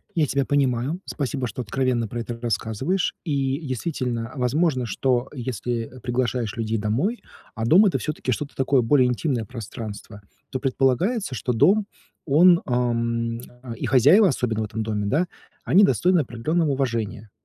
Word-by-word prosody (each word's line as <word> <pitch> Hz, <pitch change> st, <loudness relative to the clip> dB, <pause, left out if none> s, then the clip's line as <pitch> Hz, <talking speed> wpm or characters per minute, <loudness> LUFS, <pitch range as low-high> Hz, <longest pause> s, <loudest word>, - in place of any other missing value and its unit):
Я 155 Hz, -3 st, +2 dB
тебя 140 Hz, +1 st, 0 dB
понимаю. 140 Hz, +4 st, 0 dB
Спасибо, 135 Hz, -3 st, -3 dB
что 120 Hz, +3 st, -5 dB
откровенно 120 Hz, +1 st, 0 dB
про 120 Hz, +3 st, -5 dB
это 115 Hz, 0 st, -5 dB
рассказываешь. 120 Hz, -, -1 dB
И 140 Hz, -3 st, -1 dB
действительно, 125 Hz, -4 st, -3 dB
возможно, 130 Hz, +1 st, +1 dB
что 125 Hz, +3 st, 0 dB
если, 120 Hz, -3 st, -3 dB
э, 130 Hz, -, -12 dB
приглашаешь 120 Hz, -3 st, -1 dB
людей 115 Hz, -1 st, -1 dB
домой, 120 Hz, -, -1 dB, 0.3 s
а 115 Hz, -, -2 dB
дом- 180 Hz, -, +6 dB
это, -, -, +1 dB
всё-таки, 150 Hz, -4 st, -3 dB
что-то 145 Hz, +4 st, -3 dB
такое, 135 Hz, -1 st, +2 dB
более 125 Hz, +2 st, +4 dB
интимное 125 Hz, -1 st, -1 dB
пространство, 110 Hz, -2 st, -8 dB, 0.3 s
то 130 Hz, -, -2 dB
предполагается, 135 Hz, -, 0 dB
что 125 Hz, +1 st, -2 dB
дом, 200 Hz, -, +3 dB, 0.4 s
он, 170 Hz, +4 st, +5 dB
ам, 115 Hz, -2 st, -1 dB, 0.4 s
и -, -, -4 dB
хозяева, 145 Hz, -, +6 dB
особенно 120 Hz, -7 st, -1 dB
в 110 Hz, -, -1 dB
этом 110 Hz, +1 st, -4 dB
доме, 105 Hz, -2 st, -2 dB
да, 160 Hz, -, +1 dB, 0.4 s
они 195 Hz, +4 st, +5 dB
достойны 185 Hz, -2 st, +3 dB
определенного 150 Hz, +5 st, 0 dB
уважения. 115 Hz, -6 st, -2 dB
125 Hz, 150 wpm, -23 LUFS, 115-145 Hz, 0.4 s, дом